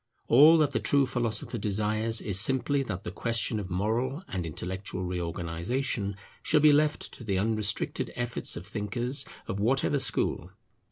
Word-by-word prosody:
All 150 Hz, +7 st, +7 dB
that 150 Hz, -3 st, +2 dB
the -, -, 0 dB
true 140 Hz, -1 st, +3 dB
philosopher 120 Hz, -2 st, -2 dB
desires 110 Hz, +2 st, +1 dB
is 95 Hz, -3 st, +2 dB
simply 135 Hz, +5 st, +2 dB
that 100 Hz, -8 st, -5 dB
the -, -, -5 dB
question 115 Hz, +1 st, -1 dB
of 95 Hz, -3 st, -6 dB
moral 115 Hz, -, -1 dB
and 90 Hz, -3 st, -4 dB
intellectual 95 Hz, +3 st, -5 dB
reorganization 90 Hz, +5 st, -2 dB, 0.3 s
shall 155 Hz, -, +3 dB
be 150 Hz, 0 st, +6 dB
left 150 Hz, +1 st, +1 dB
to -, -, -10 dB
the 100 Hz, -4 st, -1 dB
unrestricted 105 Hz, 0 st, 0 dB
efforts 120 Hz, -1 st, -2 dB
of 85 Hz, -, -8 dB
thinkers 120 Hz, +6 st, -1 dB, 0.2 s
of 100 Hz, -, -3 dB
whatever 135 Hz, +6 st, +1 dB
school. 135 Hz, -, -1 dB
110 Hz, 155 wpm, -28 LUFS, 95-130 Hz, 0.3 s, All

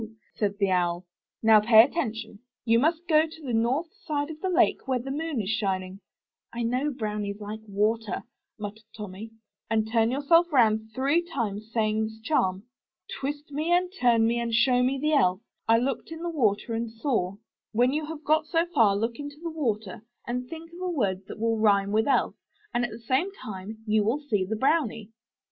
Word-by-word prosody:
said 205 Hz, -2 st, -1 dB
the 200 Hz, -2 st, +1 dB
Owl. 175 Hz, 0 st, 0 dB, 0.4 s
'*Now 220 Hz, -1 st, +7 dB
pay 220 Hz, +1 st, +6 dB
atten 280 Hz, -2 st, -1 dB
tion. 220 Hz, -2 st, -8 dB, 0.3 s
You 230 Hz, 0 st, +4 dB
must 330 Hz, +5 st, +1 dB
go 315 Hz, -1 st, +4 dB
to 320 Hz, 0 st, -13 dB
the 245 Hz, -, -3 dB
north 260 Hz, -, 0 dB
side 295 Hz, -2 st, -2 dB
of 310 Hz, -, -10 dB
the 375 Hz, -, -1 dB
lake 350 Hz, -5 st, +2 dB
when 255 Hz, -2 st, 0 dB
the 270 Hz, -, -5 dB
moon 305 Hz, -2 st, -2 dB
is 200 Hz, -3 st, -2 dB
shining 190 Hz, -2 st, -2 dB, 0.3 s
— -, -, -66 dB, 0.2 s
(/I 235 Hz, -, -2 dB
know 255 Hz, +6 st, 0 dB
brownies 210 Hz, -5 st, -3 dB
like 210 Hz, +1 st, -6 dB
water,' 215 Hz, +2 st, 0 dB, 0.3 s
muttered 210 Hz, 0 st, -7 dB, 0.2 s
Tommy) 210 Hz, +1 st, -7 dB, 0.2 s
— -, -, -56 dB
and 220 Hz, -1 st, +1 dB
turn 225 Hz, -1 st, +3 dB
yourself 330 Hz, +6 st, +3 dB
round 220 Hz, -5 st, +3 dB
three 280 Hz, +6 st, +2 dB
times, 225 Hz, -, -4 dB
saying 220 Hz, -1 st, +1 dB
this 220 Hz, 0 st, -8 dB
charm: 190 Hz, -9 st, +1 dB, 0.6 s
Twist 290 Hz, +2 st, -4 dB
me 305 Hz, +4 st, -1 dB
and 360 Hz, +1 st, +2 dB
turn 235 Hz, -2 st, +4 dB
me 235 Hz, +1 st, +1 dB
and 235 Hz, -1 st, -1 dB
show 245 Hz, +2 st, +4 dB
me 260 Hz, +2 st, +1 dB
the 305 Hz, +2 st, +1 dB
Elf 185 Hz, -9 st, +3 dB, 0.2 s
— -, -, -53 dB
I 225 Hz, -, +6 dB
looked 255 Hz, +5 st, -2 dB
in 325 Hz, +1 st, -7 dB
the 345 Hz, -, -2 dB
water 230 Hz, -6 st, 0 dB
and 230 Hz, 0 st, -2 dB
saw 225 Hz, -6 st, -1 dB
— -, -, -66 dB
' -, -, -67 dB
When 245 Hz, +4 st, +3 dB
you 305 Hz, 0 st, -2 dB
have 315 Hz, -1 st, -7 dB
got 310 Hz, 0 st, +2 dB
so 330 Hz, 0 st, +2 dB
far 220 Hz, -7 st, +4 dB
look 230 Hz, +3 st, -2 dB
into 290 Hz, 0 st, -7 dB
the 335 Hz, 0 st, -5 dB
water, 220 Hz, -, -2 dB, 0.2 s
and 250 Hz, +1 st, -3 dB
think 330 Hz, 0 st, -9 dB
of 350 Hz, -, -10 dB
a 365 Hz, -, -1 dB
word 195 Hz, -, -1 dB
that -, -, -8 dB
will 225 Hz, 0 st, +1 dB
rhyme 200 Hz, -2 st, +3 dB
with 220 Hz, +3 st, +2 dB
Elf, 280 Hz, -, +2 dB, 0.4 s
and 240 Hz, -, +1 dB
at 240 Hz, -, -1 dB
the 220 Hz, -, -8 dB
same 260 Hz, -, 0 dB, 0.2 s
moment 205 Hz, +1 st, -7 dB
you 215 Hz, -1 st, +2 dB
will 225 Hz, +7 st, +1 dB
see 210 Hz, -10 st, 0 dB
the 220 Hz, +4 st, -2 dB
brownie." 225 Hz, -4 st, 0 dB
230 Hz, 210 wpm, -27 LUFS, 215-295 Hz, 0.6 s, Now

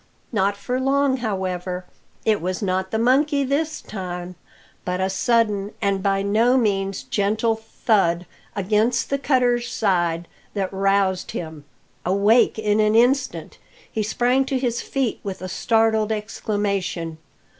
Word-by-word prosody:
Not 200 Hz, -2 st, +1 dB
for 250 Hz, +6 st, -2 dB
long, 270 Hz, 0 st, +2 dB
however. 185 Hz, -5 st, -3 dB, 0.4 s
It 215 Hz, -4 st, +2 dB
was 185 Hz, +4 st, -2 dB
not 190 Hz, 0 st, 0 dB
the 220 Hz, -, -1 dB
monkey 280 Hz, +5 st, +3 dB
this 305 Hz, +3 st, -1 dB
time, 180 Hz, -3 st, -6 dB, 0.5 s
but 180 Hz, 0 st, -2 dB
a 190 Hz, 0 st, 0 dB
sudden 210 Hz, -1 st, +1 dB
and 200 Hz, -2 st, 0 dB
by 195 Hz, 0 st, +1 dB
no 225 Hz, +6 st, +3 dB
means 195 Hz, -5 st, 0 dB
gentle 215 Hz, +3 st, +1 dB
thud 200 Hz, -5 st, 0 dB, 0.3 s
against 215 Hz, +6 st, +1 dB
the 275 Hz, -, +1 dB
cutters 245 Hz, -3 st, +1 dB
side 175 Hz, -5 st, 0 dB, 0.3 s
that 195 Hz, -1 st, -2 dB
roused 195 Hz, -1 st, +1 dB
him. 160 Hz, -3 st, -6 dB, 0.4 s
Awake 200 Hz, +7 st, +3 dB
in 210 Hz, -1 st, +1 dB
an 215 Hz, 0 st, +3 dB
instant, 250 Hz, +4 st, +1 dB, 0.3 s
he 220 Hz, -, -1 dB
sprang 245 Hz, +5 st, +2 dB
to 265 Hz, 0 st, -1 dB
his 240 Hz, -2 st, -1 dB
feet 265 Hz, -5 st, -2 dB
with 195 Hz, -2 st, -5 dB
a 185 Hz, -, -5 dB
startled 220 Hz, +2 st, +2 dB
exclamation. 200 Hz, -6 st, -2 dB
210 Hz, 135 wpm, -22 LUFS, 190-240 Hz, 0.5 s, monkey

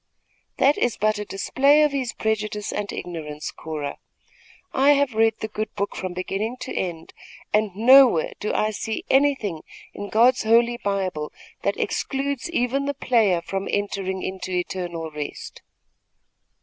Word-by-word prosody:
"That 280 Hz, +2 st, +4 dB
is 245 Hz, -, +1 dB
but 215 Hz, 0 st, +1 dB
a 210 Hz, -, -4 dB
display 275 Hz, +10 st, +3 dB
of 300 Hz, -, +3 dB
his 265 Hz, -4 st, -2 dB
prejudice 215 Hz, -1 st, -2 dB
and 205 Hz, -1 st, -3 dB
ignorance, 155 Hz, -4 st, -6 dB
Cora. 150 Hz, -3 st, -6 dB, 0.7 s
I 275 Hz, +2 st, +5 dB
have 280 Hz, -3 st, +1 dB
read 225 Hz, 0 st, +3 dB
the 220 Hz, -, -2 dB
good 215 Hz, 0 st, -4 dB
book 200 Hz, -, -2 dB
from 185 Hz, -1 st, -4 dB
beginning 195 Hz, +6 st, -3 dB
to 260 Hz, -, -5 dB
end, 170 Hz, -3 st, -4 dB, 0.4 s
and 210 Hz, -3 st, +1 dB
nowhere 245 Hz, -5 st, +6 dB
do 210 Hz, -, -2 dB
I 215 Hz, -, +1 dB
see 215 Hz, +2 st, -4 dB
anything 265 Hz, -, +2 dB, 0.3 s
in 205 Hz, 0 st, -6 dB
God's 245 Hz, +4 st, +4 dB
Holy 235 Hz, +2 st, +3 dB
Bible 190 Hz, -8 st, -2 dB, 0.3 s
that -, -, 0 dB
excludes 275 Hz, +1 st, -2 dB
even 275 Hz, -3 st, 0 dB
the 285 Hz, 0 st, -2 dB
player 215 Hz, -10 st, +2 dB
from 195 Hz, 0 st, -3 dB
entering 195 Hz, -2 st, -2 dB
into 185 Hz, 0 st, -5 dB
eternal 175 Hz, -2 st, -3 dB
rest." 150 Hz, -1 st, -7 dB
215 Hz, 150 wpm, -23 LUFS, 185-250 Hz, 0.7 s, nowhere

